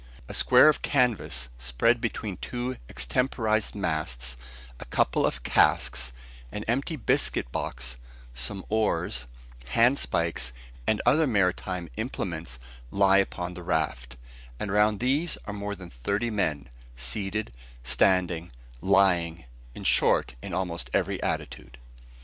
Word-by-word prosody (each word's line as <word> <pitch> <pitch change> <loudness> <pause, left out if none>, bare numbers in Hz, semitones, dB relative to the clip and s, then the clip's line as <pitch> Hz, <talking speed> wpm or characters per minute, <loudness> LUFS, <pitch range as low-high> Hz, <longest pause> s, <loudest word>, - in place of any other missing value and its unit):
A - - -7
square - - +6
of 155 - +4
canvas 115 - +1
spread 65 - +2
between 110 -4 -3
two 125 +4 -4
extemporised 110 - 0
masts, 70 -10 -2 0.4
a - - -7
couple - - +2
of - - -4
casks, 60 0 +2 0.4
an 105 - -4
empty 135 +7 0
biscuit 110 - 0
box, 65 0 -4 0.4
some 95 +10 -3
oars, 110 - 0 0.5
handspikes, 85 - +2 0.3
and 110 - +1
other 155 +1 +4
maritime 90 -4 0
implements, 85 - -4 0.3
lie 100 +2 +5
upon 90 -2 -2
the 90 - -8
raft; 65 -7 -2 0.4
and 105 - -2
around 105 0 +3
these 145 +7 +1
are 100 - -5
more 100 0 -4
than 90 -3 -11
thirty 100 - -1
men, 75 -10 -1 0.3
seated, 95 - -3 0.3
standing, 85 +6 +2 0.3
lying, 90 -6 +3 0.3
in - - -8
short, - - +3
in - - -7
almost 90 -3 -2
every - - 0
attitude. - - -4
95 Hz, 120 wpm, -27 LUFS, 70-110 Hz, 0.5 s, square